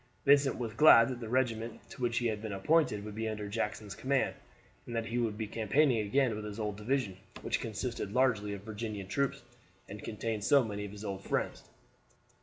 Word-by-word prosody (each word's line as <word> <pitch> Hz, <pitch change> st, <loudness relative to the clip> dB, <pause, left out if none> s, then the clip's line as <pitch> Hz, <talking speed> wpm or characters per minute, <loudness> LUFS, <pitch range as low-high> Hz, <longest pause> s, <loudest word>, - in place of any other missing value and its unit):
Vincent 140 Hz, -1 st, +5 dB
was 115 Hz, -3 st, -4 dB
glad 115 Hz, -2 st, +8 dB
that 125 Hz, -2 st, -4 dB
the 115 Hz, -2 st, -6 dB
regiment 115 Hz, -2 st, 0 dB
to 130 Hz, -, -10 dB
which 120 Hz, -1 st, 0 dB
he 120 Hz, -, +1 dB
had 110 Hz, -2 st, -1 dB
been 110 Hz, -2 st, -4 dB
appointed 105 Hz, 0 st, +2 dB
would 105 Hz, -, -6 dB
be 110 Hz, +1 st, -2 dB
under 105 Hz, -1 st, -4 dB
Jackson's 105 Hz, -1 st, -3 dB
command, 135 Hz, +5 st, 0 dB, 0.5 s
and 120 Hz, -, -5 dB
that 115 Hz, 0 st, -1 dB
he 120 Hz, +2 st, -2 dB
would 110 Hz, -3 st, -1 dB
be 110 Hz, -, -2 dB
campaigning 115 Hz, +4 st, +2 dB
again 115 Hz, +3 st, +1 dB
with 105 Hz, -, -5 dB
his 105 Hz, +1 st, -6 dB
old 105 Hz, -2 st, -2 dB
division, 105 Hz, -2 st, -1 dB, 0.3 s
which -, -, 0 dB
consisted 110 Hz, -1 st, -4 dB
largely 115 Hz, -4 st, +2 dB
of 100 Hz, -1 st, -7 dB
Virginian 105 Hz, -2 st, -5 dB
troops 140 Hz, +7 st, -1 dB, 0.4 s
and 105 Hz, +1 st, -8 dB
contained 110 Hz, -1 st, -3 dB
so 140 Hz, +3 st, +5 dB
many 105 Hz, -2 st, -4 dB
of 100 Hz, -, -8 dB
his 105 Hz, +1 st, -8 dB
old 100 Hz, -1 st, -4 dB
friends. -, -, -2 dB
110 Hz, 205 wpm, -32 LUFS, 105-125 Hz, 0.5 s, glad